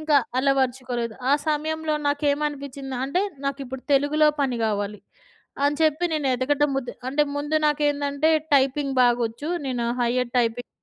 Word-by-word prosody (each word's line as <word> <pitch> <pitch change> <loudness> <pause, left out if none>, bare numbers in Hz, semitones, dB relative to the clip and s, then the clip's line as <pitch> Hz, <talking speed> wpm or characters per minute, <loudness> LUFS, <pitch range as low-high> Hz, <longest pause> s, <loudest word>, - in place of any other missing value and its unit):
ఇంకా 310 -1 +3 0.2
అలవర్చుకోలేదు. 255 -3 0 0.2
ఆ - - +5 0.2
సమయంలో 310 +1 -1
నాకేమనిపించిందంటే 285 0 -1 0.2
నాకిప్పుడు 270 -2 -4
తెలుగులో 295 +2 +4
పని 260 -3 0
గావాలి. 205 -1 -2 0.7
అని 290 0 +2
చెప్పి 315 +2 +2
నేను 300 -3 -1
ఎతకటం 285 +3 +1
ముద్ 270 -2 -2 0.2
అంటే 285 +3 +2
ముందు 295 +2 0
నాకేందంటే 290 0 +1 0.3
టైపింగ్ 275 0 +2
బాగొచ్చు. 240 +3 +1 0.2
నేను 245 -3 -2 0.2
హైయర్ 245 +1 0
టైపింగ్ 240 0 0
275 Hz, 120 wpm, -24 LUFS, 250-295 Hz, 0.7 s, ఆ